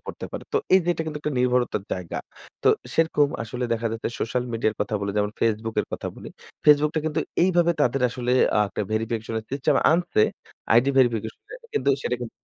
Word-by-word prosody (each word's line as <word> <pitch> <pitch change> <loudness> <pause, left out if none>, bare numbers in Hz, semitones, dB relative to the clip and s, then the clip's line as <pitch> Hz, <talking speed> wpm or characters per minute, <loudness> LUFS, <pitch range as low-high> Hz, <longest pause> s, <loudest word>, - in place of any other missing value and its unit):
পড়তে - - -6
পারে। - - -6
তো - - +2 0.2
এই 190 - +7
যে - - -4
এটা 165 - -3
কিন্তু 150 -1 -4
একটা 150 -1 -2
নির্ভরতার 125 -4 +1
জায়গা। 90 -3 -4 0.4
তো - - +4 0.3
সেরকম 160 -3 +3
আসলে 125 +2 -4
দেখা 115 0 -1
যাচ্ছে, 115 - -3
সোশ্যাল 125 +2 -1
মিডিয়ার 110 -1 0
কথা 105 +1 -1
বলি 100 0 -2
যেমন 105 0 +1
Facebook 115 0 0
এর - - -6
কথা - - -3
বলি। - - -9 0.4
Facebook 150 0 +6
টা 160 - +1
কিন্তু 155 - 0 0.2
এইভাবে 175 -2 +3
তাদের 125 -1 +2
আসলে 125 0 -2 0.2
আ - - +4
একটা 105 - -3
ভেরিফিকেশন 115 0 -2 0.2
সিস্টেম 140 0 +1 0.2
আনছে। 175 -10 +2 0.5
আইডি 120 +4 +5
ভেরিফিকেশনের 115 - 0 0.2
কিন্তু 140 - +2
সেটা 125 - -1
কিন্তু 120 - -5
125 Hz, 195 wpm, -24 LUFS, 110-150 Hz, 0.5 s, এই